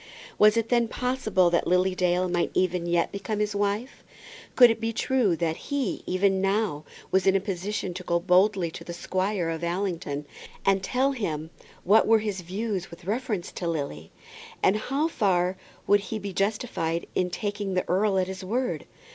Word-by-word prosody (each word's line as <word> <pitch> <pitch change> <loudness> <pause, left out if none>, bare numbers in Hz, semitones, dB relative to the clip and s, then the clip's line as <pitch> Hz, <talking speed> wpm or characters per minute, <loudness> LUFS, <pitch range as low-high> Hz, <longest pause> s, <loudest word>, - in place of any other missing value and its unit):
Was 210 +1 +6
it 230 0 0
then 235 -1 +3
possible 225 -8 +1
that 170 - +1
Lily 180 +1 +3
Dale 180 0 +1
might 175 -1 0
even 180 -1 +1
yet 170 -1 +1
become 200 +2 -3
his 210 0 -1
wife? 205 +5 -2 0.5
Could 245 -2 +8
it 225 - -4
be 225 0 0
true 230 -5 +1
that 160 -1 -1
he, 280 -8 -1
even 190 +1 +2
now, 195 -6 0 0.3
was 190 +1 +2
in 190 - +5
a - - +4
position 190 0 -3
to 185 - -7
go 170 -1 +1
boldly 185 0 +3
to - - -9
the 170 - -7
Squire 185 -1 -1
of 165 +1 -5
Allington, 170 -5 -2 0.4
and 195 0 +3
tell 260 +7 +1
him 160 - -3 0.3
what 205 +5 +5
were 225 0 +6
his 210 -3 -3
views 195 +1 -3
with 170 +1 -13
reference 215 -3 -2
to 175 - -4
Lily? 140 - -4 0.5
And 190 - +4
how 275 +8 0
far 185 - +1 0.3
would 205 - +5
he 215 +2 -5
be 200 -2 -6
justified 195 -5 -1
in 180 -1 0
taking 200 +1 -3
the 185 - 0
earl 195 +2 +2
at 185 - +2
his 190 0 -7
word? 245 +7 -2
190 Hz, 180 wpm, -26 LUFS, 175-215 Hz, 0.5 s, Could